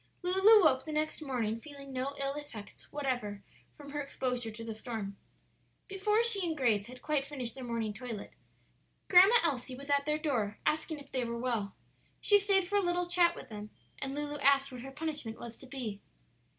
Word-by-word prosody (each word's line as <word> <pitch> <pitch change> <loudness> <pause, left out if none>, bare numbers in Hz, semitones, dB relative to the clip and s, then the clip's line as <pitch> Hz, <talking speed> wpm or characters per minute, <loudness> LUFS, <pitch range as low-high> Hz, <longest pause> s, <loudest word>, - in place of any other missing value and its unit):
Lulu 385 +4 +7
woke 265 -4 +4
the 310 - -6
next 310 +1 -1
morning 235 -6 -1
feeling 280 0 -11
no 265 +2 -2
ill 275 0 0
effects 265 -8 -9
whatever 245 -8 -2 0.3
from 285 -1 -10
her 295 0 -2
exposure 250 -4 -2
to 225 +1 -8
the 225 -1 -4
storm. 215 -3 -5 0.7
Before 420 +3 +2
she 440 -5 0
and 325 -3 -1
Grace 220 -6 +2
had 255 +1 -11
quite 300 -3 +1
finished 260 -5 -4
their 265 - -7
morning 230 -3 -2
toilet 230 -2 -7 0.8
Grandma 380 +5 +8
Elsie 260 -5 0
was 280 +2 -6
at 280 0 +2
their 300 0 +2
door, 240 -10 -1
asking 315 +1 0
if 280 -1 -12
they 255 -2 0
were 235 0 -3
well. 235 -5 -2 0.4
She 410 -1 +5
stayed 390 -2 +2
for 410 +2 +1
a - - +4
little 355 0 +1
chat 350 -1 +4
with - - -10
them, 210 -1 -7 0.3
and 270 +1 -3
Lulu 295 0 -3
asked 275 0 +4
what 250 -2 -7
her 270 - -7
punishment 290 -6 -4
was 235 -1 -7
to 265 - -12
be. 240 -7 -5
275 Hz, 195 wpm, -32 LUFS, 235-310 Hz, 0.8 s, Grandma